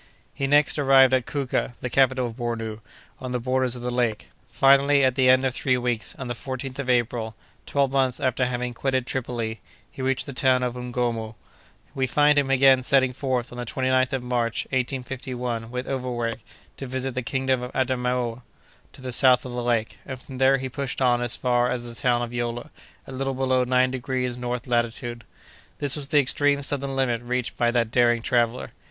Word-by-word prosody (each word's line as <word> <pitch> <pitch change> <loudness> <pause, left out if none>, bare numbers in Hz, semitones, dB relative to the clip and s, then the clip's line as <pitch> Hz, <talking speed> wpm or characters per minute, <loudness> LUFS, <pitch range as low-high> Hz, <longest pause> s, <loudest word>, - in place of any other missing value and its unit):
He 135 - -2
next 145 +2 +3
arrived 135 -2 +6
at 130 -2 +1
Kouka, 135 -3 -2
the - - -3
capital 130 0 +2
of 120 - -5
Bornou, 115 -3 -4 0.4
on 130 -1 -5
the 125 - 0
borders 130 0 0
of 120 - -7
the 125 - -2
lake. 120 -3 -1 0.2
Finally, 140 +1 +4
at 130 - +2
the 130 -1 +3
end 130 +1 +5
of 130 - 0
three 130 -1 +1
weeks, 120 -3 -2
on 130 - -6
the 120 - -2
14th 130 +2 -6
of 135 -2 -3
April, 120 -2 0 0.3
twelve 140 -2 +1
months 130 -2 +1
after 130 -1 0
having 125 0 -3
quitted 130 +1 -1
Tripoli, 120 -4 -4 0.3
he - - -9
reached 130 0 0
the 140 - -7
town 130 -1 +2
of 125 -1 -1
Ngornou. 120 -3 -3 0.6
We 135 -2 0
find 145 +3 +4
him 140 -1 -1
again 135 -1 +5
setting 130 0 +2
forth 130 -2 -2
on 120 - -8
the - - -2
29th 130 +1 +1
of 130 -2 -2
March, 120 -2 -1
1851, 125 -2 -3
with 125 +1 -5
Overweg, 120 -3 -3 0.4
to 135 - -6
visit 130 +1 -3
the 130 - -2
kingdom 130 0 -1
of 125 - -6
Adamaoua, 125 -2 -1 0.5
to - - -13
the 130 - -4
south 130 0 +5
of 125 - -6
the 120 0 -3
lake, 120 -2 -1
and 130 -2 -7
from 130 0 -10
there 135 +1 +5
he 130 0 -4
pushed 135 0 -4
on 120 -2 +2
as 120 0 0
far 125 -1 +1
as 120 -1 -2
the 120 -1 -7
town 120 -3 +2
of 120 0 -6
Yola, 120 +3 -4 0.3
a - - -11
little 135 0 -3
below 130 -1 +1
nine 125 0 +2
degrees 125 -1 -2
north 125 0 -4
latitude. 120 -1 -2 0.5
This 145 -2 +2
was 145 -3 -5
the 145 +1 +3
extreme 145 +1 +2
southern 140 -1 -1
limit 125 -3 0
reached 125 0 -3
by 120 - +2
that 120 -2 0
daring 120 -1 +3
traveller. 120 0 0
125 Hz, 200 wpm, -24 LUFS, 120-130 Hz, 0.6 s, arrived